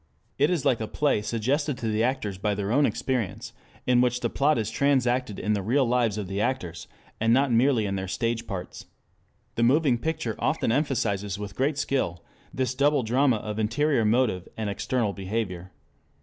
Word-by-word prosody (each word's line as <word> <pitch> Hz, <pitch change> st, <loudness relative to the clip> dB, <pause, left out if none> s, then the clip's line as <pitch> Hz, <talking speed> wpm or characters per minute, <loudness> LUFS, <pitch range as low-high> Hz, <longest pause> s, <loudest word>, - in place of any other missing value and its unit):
It 145 Hz, +3 st, +4 dB
is 175 Hz, -7 st, -1 dB
like 120 Hz, -3 st, +2 dB
a 110 Hz, -, -2 dB
play 145 Hz, -5 st, +1 dB
suggested 130 Hz, +6 st, -1 dB
to 115 Hz, -, -3 dB
the 110 Hz, 0 st, 0 dB
actors 120 Hz, -7 st, -1 dB
by 105 Hz, 0 st, 0 dB
their 100 Hz, +1 st, -2 dB
own 140 Hz, +4 st, +4 dB
experience, 125 Hz, -7 st, -3 dB, 0.3 s
in 125 Hz, -1 st, +4 dB
which 125 Hz, 0 st, +1 dB
the 120 Hz, -, -1 dB
plot 150 Hz, +2 st, +2 dB
is 110 Hz, -2 st, -2 dB
transacted 125 Hz, -5 st, +1 dB
in 105 Hz, -, 0 dB
the 100 Hz, -, 0 dB
real 130 Hz, +7 st, +2 dB
lives 120 Hz, -3 st, +1 dB
of 105 Hz, -3 st, -4 dB
the 100 Hz, +2 st, -2 dB
actors, 90 Hz, -9 st, -3 dB, 0.3 s
and 115 Hz, +1 st, +2 dB
not 135 Hz, +2 st, +3 dB
merely 120 Hz, -1 st, +3 dB
in 100 Hz, -1 st, -2 dB
their 95 Hz, 0 st, -4 dB
stage 115 Hz, +3 st, -2 dB
parts. 90 Hz, -3 st, -6 dB, 0.7 s
The -, -, -2 dB
moving 130 Hz, 0 st, +3 dB
picture 120 Hz, -6 st, -2 dB
often -, -, 0 dB
emphasizes 110 Hz, -8 st, 0 dB
with 100 Hz, -1 st, -7 dB
great 140 Hz, +2 st, 0 dB
skill 90 Hz, -14 st, -1 dB, 0.3 s
this 130 Hz, -2 st, -1 dB
double 140 Hz, 0 st, +2 dB
drama 125 Hz, +3 st, +3 dB
of 105 Hz, 0 st, -5 dB
interior 120 Hz, +4 st, +1 dB
motive 110 Hz, -5 st, +1 dB
and 110 Hz, -2 st, -2 dB
external 110 Hz, 0 st, -1 dB
behavior. 95 Hz, -2 st, -4 dB
115 Hz, 185 wpm, -26 LUFS, 105-130 Hz, 0.7 s, It